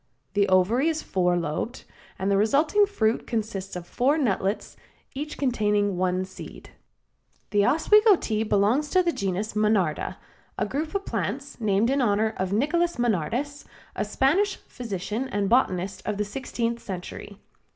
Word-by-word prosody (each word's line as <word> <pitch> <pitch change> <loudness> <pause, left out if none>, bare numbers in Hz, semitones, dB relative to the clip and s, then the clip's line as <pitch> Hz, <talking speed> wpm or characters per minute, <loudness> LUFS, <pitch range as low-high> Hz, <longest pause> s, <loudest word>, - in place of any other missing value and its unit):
The 200 -1 +2
ovary 200 - +3
is 315 -1 -2
four 180 -1 +1
lobed, 170 +9 -3 0.3
and 195 +1 -1
the - - +4
resulting 300 - +3
fruit 225 - 0
consists 210 -5 -3
of 180 -1 -6
four 270 - +1
nutlets, 200 -7 -1 0.4
each 295 +2 -5
containing 210 -6 +1
one 185 +1 0
seed. 185 - -11 0.8
The 205 -1 +3
Oswego 420 - +5
Tea 220 -9 -2
belongs 220 +7 +2
to 370 -1 +3
the 345 - +1
genus 200 - -2
Monarda, 205 -5 +1 0.4
a 210 - 0
group 305 - -3
of 395 0 -1
plants 280 0 -4
named 215 +3 +2
in 275 0 +2
honor 220 -1 +2
of 185 0 -2
Nicolas 335 +10 +1
Monardes, 240 - -1 0.3
a - - -1
Spanish 380 +10 +2
physician 225 +2 -4
and 205 -4 -1
botanist 195 -5 +1
of 210 -1 -2
the 210 - 0
sixteenth 235 +1 -3
century. 190 +1 -7
220 Hz, 150 wpm, -25 LUFS, 195-275 Hz, 0.8 s, Oswego